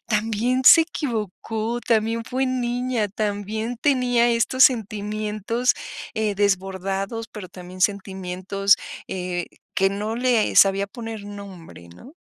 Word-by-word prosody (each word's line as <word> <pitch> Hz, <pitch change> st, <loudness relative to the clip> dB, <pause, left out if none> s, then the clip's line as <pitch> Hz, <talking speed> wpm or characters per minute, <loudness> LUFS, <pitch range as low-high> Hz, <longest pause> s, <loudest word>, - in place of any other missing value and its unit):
también 225 Hz, +3 st, 0 dB
se 330 Hz, -, +10 dB
equivocó, 225 Hz, -, -3 dB
también 230 Hz, 0 st, +1 dB
fue 260 Hz, +3 st, -1 dB
niña, 245 Hz, -3 st, -1 dB
también 215 Hz, +3 st, -3 dB
tenía 245 Hz, -3 st, +2 dB
estos 235 Hz, +3 st, +4 dB
sentimientos, 215 Hz, +1 st, 0 dB, 0.4 s
eh, 215 Hz, -2 st, 0 dB
desbordados, 195 Hz, +2 st, -1 dB
pero 205 Hz, -4 st, -9 dB
también 185 Hz, 0 st, -8 dB
sentimientos, 195 Hz, 0 st, +1 dB, 0.3 s
eh, 180 Hz, -2 st, -3 dB, 0.3 s
que 195 Hz, -, +3 dB
no 210 Hz, +3 st, -3 dB
le 245 Hz, -3 st, +2 dB
sabía 195 Hz, 0 st, +5 dB
poner 225 Hz, -1 st, -7 dB
nombre", 195 Hz, -, -10 dB
¿no? 90 Hz, -, -14 dB
215 Hz, 110 wpm, -23 LUFS, 195-235 Hz, 0.4 s, se